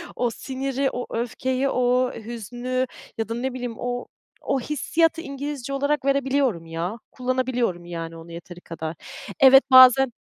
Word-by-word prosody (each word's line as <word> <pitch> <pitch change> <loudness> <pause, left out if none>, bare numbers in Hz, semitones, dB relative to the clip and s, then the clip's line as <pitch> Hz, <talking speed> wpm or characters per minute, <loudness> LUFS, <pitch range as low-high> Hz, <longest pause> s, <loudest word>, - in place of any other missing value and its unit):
o 245 - 0
siniri, 270 +3 -2
o 245 - -4
öfkeyi, 255 +3 -1
o 250 0 +1
hüznü 240 +3 -4 0.3
ya 225 0 -3
da, - - -2
ne 255 +2 -3
bileyim, 245 -2 -5
o 245 0 -4 0.3
o 275 - 0
hissiyatı 320 +5 0
İngilizce 280 -2 -5
olarak 285 0 0
verebiliyorum, 270 -9 +1
ya, 165 +6 -4
kullanabiliyorum, 250 -8 -1
yani, 165 -1 -6
onu 165 +1 -12
yeteri 175 +1 -10
kadar. 165 -1 -6 0.4
Evet, 270 0 +8
bazen 255 0 +8
250 Hz, 140 wpm, -24 LUFS, 225-270 Hz, 0.4 s, Evet